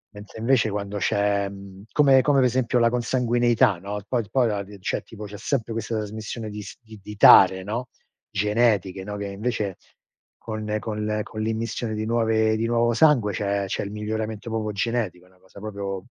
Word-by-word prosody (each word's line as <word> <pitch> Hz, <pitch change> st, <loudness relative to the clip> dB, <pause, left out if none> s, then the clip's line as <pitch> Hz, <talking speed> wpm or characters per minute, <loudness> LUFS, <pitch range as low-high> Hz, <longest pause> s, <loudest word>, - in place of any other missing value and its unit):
mentre 105 Hz, +2 st, -11 dB
invece 115 Hz, -1 st, +2 dB
quando 100 Hz, 0 st, -4 dB
c'è, 100 Hz, +1 st, +1 dB
mhmm, 100 Hz, 0 st, -11 dB
come 135 Hz, -3 st, +5 dB
come 140 Hz, 0 st, +3 dB
per 125 Hz, -, +4 dB
esempio 125 Hz, 0 st, +1 dB
la 115 Hz, 0 st, +4 dB
consanguineità, 120 Hz, -2 st, +2 dB
no, 100 Hz, +2 st, -5 dB
poi 120 Hz, -3 st, 0 dB
d -, -, -17 dB
poi 130 Hz, -3 st, +3 dB
la 105 Hz, -2 st, -1 dB
rie 100 Hz, 0 st, -11 dB
cioè, 90 Hz, -, -2 dB
tipo, 105 Hz, -1 st, -10 dB
c'è 105 Hz, 0 st, -9 dB
sempre 115 Hz, 0 st, -2 dB
questa 115 Hz, 0 st, -2 dB
trasmissione 110 Hz, +1 st, -5 dB
di 105 Hz, 0 st, -7 dB
s -, -, -10 dB
di 110 Hz, -2 st, -14 dB
di 105 Hz, +2 st, -9 dB
dare, 95 Hz, -2 st, +8 dB
no 115 Hz, +5 st, -4 dB, 0.5 s
genetiche, 105 Hz, -2 st, +1 dB
no, 105 Hz, 0 st, -5 dB
che 100 Hz, -, -4 dB
invece 100 Hz, -1 st, -3 dB, 0.6 s
con- 110 Hz, -1 st, -4 dB
con 105 Hz, -1 st, -4 dB
le 105 Hz, 0 st, -1 dB
con 110 Hz, -, -9 dB
l'immissione 115 Hz, +1 st, -2 dB
di 110 Hz, -, -3 dB
nuove 110 Hz, -1 st, +2 dB
di 115 Hz, -, -1 dB
nuovo 120 Hz, 0 st, +2 dB
sangue 125 Hz, -6 st, +4 dB
c'è 100 Hz, 0 st, -1 dB
c'è -, -, -2 dB
il 100 Hz, -, -6 dB
miglioramento 110 Hz, +1 st, -4 dB
proprio 110 Hz, -1 st, -2 dB
genetico. 105 Hz, -5 st, -2 dB
È -, -, -23 dB
una 95 Hz, -, -27 dB
cosa 95 Hz, +2 st, -16 dB
proprio 100 Hz, -3 st, -5 dB
110 Hz, 195 wpm, -24 LUFS, 100-115 Hz, 0.6 s, dare